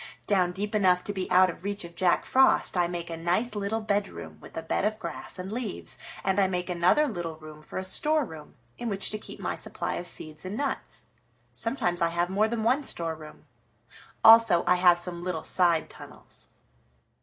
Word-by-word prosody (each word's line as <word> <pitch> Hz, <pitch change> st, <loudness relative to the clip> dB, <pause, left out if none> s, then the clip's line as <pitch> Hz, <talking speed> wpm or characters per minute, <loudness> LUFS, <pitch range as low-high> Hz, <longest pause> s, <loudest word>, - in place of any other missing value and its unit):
Down 185 Hz, -3 st, +2 dB
deep 205 Hz, +4 st, -4 dB
enough 185 Hz, -4 st, +3 dB
to 205 Hz, -, -3 dB
be 190 Hz, -2 st, -4 dB
out 185 Hz, 0 st, +5 dB
of 170 Hz, -, -15 dB
reach 200 Hz, 0 st, -3 dB
of 170 Hz, 0 st, -10 dB
Jack 180 Hz, 0 st, +2 dB
Frost 265 Hz, -5 st, +4 dB
I 175 Hz, -1 st, +2 dB
make 170 Hz, -1 st, -5 dB
a -, -, -3 dB
nice 180 Hz, +8 st, 0 dB
little 210 Hz, +2 st, -2 dB
bedroom 205 Hz, -1 st, -3 dB
with -, -, -12 dB
a 165 Hz, -, -3 dB
bed 165 Hz, -, -1 dB
of 215 Hz, +1 st, 0 dB
grass -, -, -5 dB
and 185 Hz, +2 st, -6 dB
leaves, 230 Hz, -3 st, -4 dB, 0.2 s
and 190 Hz, +1 st, +1 dB
I 195 Hz, -, +4 dB
make 180 Hz, -1 st, -3 dB
another 180 Hz, -, +3 dB
little 175 Hz, -, -4 dB
room 155 Hz, -1 st, -12 dB
for -, -, -9 dB
a 185 Hz, -, -2 dB
storeroom 205 Hz, -, 0 dB, 0.2 s
in 240 Hz, -, -3 dB
which 195 Hz, -1 st, +1 dB
to 215 Hz, -, -3 dB
keep -, -, -10 dB
my -, -, -2 dB
supply -, -, -4 dB
of 175 Hz, -, -5 dB
seeds 155 Hz, -2 st, -6 dB
and 190 Hz, +3 st, -5 dB
nuts. 280 Hz, 0 st, -2 dB, 0.5 s
Sometimes 185 Hz, -8 st, -1 dB
I 170 Hz, -, +4 dB
have 175 Hz, +2 st, -1 dB
more 210 Hz, +3 st, +2 dB
than 225 Hz, -1 st, -2 dB
one 255 Hz, +6 st, +2 dB
storeroom. 160 Hz, -, -4 dB, 0.8 s
Also 225 Hz, -6 st, +7 dB
I 180 Hz, -, +4 dB
have 180 Hz, -1 st, +6 dB
some 175 Hz, 0 st, -2 dB
little 175 Hz, -3 st, -3 dB
side 170 Hz, -3 st, +2 dB
tunnels." -, -, -12 dB
185 Hz, 200 wpm, -27 LUFS, 175-215 Hz, 0.8 s, Also